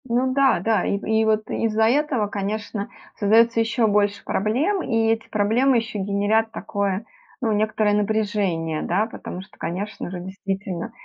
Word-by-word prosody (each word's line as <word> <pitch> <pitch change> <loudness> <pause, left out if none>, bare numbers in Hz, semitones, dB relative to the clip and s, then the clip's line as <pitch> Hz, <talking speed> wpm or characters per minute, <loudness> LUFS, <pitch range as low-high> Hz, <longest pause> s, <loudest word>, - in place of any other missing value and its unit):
Ну 255 +2 +1
да, 270 -7 +4
да. 220 +4 +1
И 200 - 0
в - - -8
и 220 0 +2
вот 215 0 +1
из-за 220 -1 +1
этого, 255 -2 +2
конечно, 205 0 -4 0.3
создается 230 +3 +4
еще 225 +1 +2
больше 205 -1 +1
проблем, 275 - 0
и 225 -1 +1
эти 225 -1 -2
проблемы 230 +5 +3
еще 225 -2 -3
генерят 205 +3 +1
такое, 200 -1 -2 0.3
ну, 230 -4 0
некоторое 215 0 +1
напряжение, 205 -7 0
да. 200 +5 +1
Потому 185 -4 -7
что, 190 - -17
конечно 195 +3 -4
же, 180 0 -5
действительно, 195 +2 -5
215 Hz, 160 wpm, -23 LUFS, 200-225 Hz, 0.3 s, да